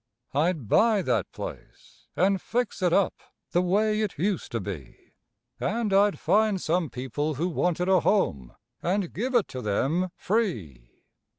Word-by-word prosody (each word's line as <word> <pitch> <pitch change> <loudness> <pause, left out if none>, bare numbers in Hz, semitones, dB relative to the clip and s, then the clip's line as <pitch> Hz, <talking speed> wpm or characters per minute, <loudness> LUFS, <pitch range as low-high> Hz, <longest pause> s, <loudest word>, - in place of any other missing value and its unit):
I'd 150 - 0
buy 215 - +4
that 125 -5 0
place - - -10
and 190 +1 +2
fix 245 -3 -2
it 180 -2 +2
up 195 +1 +2 0.3
the 175 - +3
way 210 +4 +2
it 210 -3 -2
used 190 0 -1
to 115 - 0
be 90 - -8 0.5
And 220 -1 -1
I'd 200 +1 +4
find 215 -2 +2
some 170 -1 0
people 135 +5 -3
who 165 +7 -1
wanted 180 0 0
a 190 -1 +5
home 70 - 0 0.3
and 185 0 -1
give 250 +7 -2
it 235 - +3
to 130 - -6
them 140 - 0
free. 110 - -3
180 Hz, 155 wpm, -26 LUFS, 135-205 Hz, 0.5 s, a